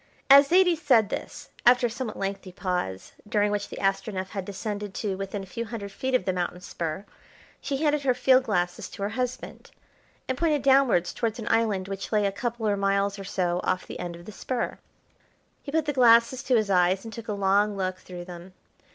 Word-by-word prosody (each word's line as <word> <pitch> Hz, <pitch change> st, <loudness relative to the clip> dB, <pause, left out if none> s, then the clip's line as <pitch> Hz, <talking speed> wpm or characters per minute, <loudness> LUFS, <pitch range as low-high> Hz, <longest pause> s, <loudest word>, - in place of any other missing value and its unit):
As 280 Hz, +1 st, +9 dB
Zaidie 360 Hz, +1 st, +5 dB
said 255 Hz, -, +3 dB
this, -, -, -6 dB
after 245 Hz, 0 st, +5 dB
a -, -, +1 dB
somewhat 235 Hz, -2 st, -5 dB
lengthy 195 Hz, -1 st, -4 dB
pause, 180 Hz, -, -3 dB, 0.2 s
during 210 Hz, -2 st, +2 dB
which 205 Hz, 0 st, -2 dB
the -, -, -8 dB
Astronef 195 Hz, -1 st, -1 dB
had 195 Hz, -3 st, -5 dB
descended 205 Hz, 0 st, -5 dB
to 205 Hz, -3 st, -2 dB
within 195 Hz, +1 st, -5 dB
a -, -, -8 dB
few 230 Hz, +5 st, -5 dB
hundred 210 Hz, -3 st, -6 dB
feet 260 Hz, +5 st, -2 dB
of 220 Hz, -, +1 dB
the 185 Hz, -, 0 dB
mountain 180 Hz, 0 st, -3 dB
spur, 170 Hz, +1 st, -5 dB, 0.6 s
she 275 Hz, -, -2 dB
handed 300 Hz, -1 st, +2 dB
her 260 Hz, -3 st, +2 dB
field 260 Hz, 0 st, +4 dB
glasses 175 Hz, -5 st, -1 dB
to 200 Hz, -, -7 dB
her 200 Hz, -, 0 dB
husband, 250 Hz, +3 st, -5 dB, 0.6 s
and 260 Hz, 0 st, -2 dB
pointed 305 Hz, -5 st, +1 dB
downwards 265 Hz, -10 st, +4 dB
towards 225 Hz, -1 st, -2 dB
an 225 Hz, -, -7 dB
island 215 Hz, -5 st, +1 dB
which 195 Hz, 0 st, -6 dB
lay 210 Hz, -2 st, +2 dB
a 200 Hz, -, +1 dB
couple 230 Hz, +2 st, -3 dB
or 205 Hz, -, +2 dB
miles 200 Hz, 0 st, 0 dB
or -, -, -6 dB
so 180 Hz, -2 st, -1 dB
off 185 Hz, -, -1 dB
the -, -, -8 dB
end 175 Hz, -1 st, -5 dB
of 170 Hz, 0 st, -13 dB
the 215 Hz, -, -8 dB
spur. 240 Hz, +4 st, -3 dB, 0.8 s
He 280 Hz, -, -8 dB
put 315 Hz, 0 st, +1 dB
the 295 Hz, -, -1 dB
glasses 235 Hz, 0 st, +5 dB
to 255 Hz, -, +3 dB
his 215 Hz, -3 st, +1 dB
eyes, 185 Hz, +1 st, +3 dB
and 225 Hz, -, -8 dB
took 230 Hz, -2 st, -8 dB
a 210 Hz, -, -2 dB
long 200 Hz, +1 st, +2 dB
look 185 Hz, -1 st, -2 dB
through 175 Hz, -1 st, -9 dB
them. 180 Hz, +1 st, -10 dB
205 Hz, 210 wpm, -26 LUFS, 190-245 Hz, 0.8 s, As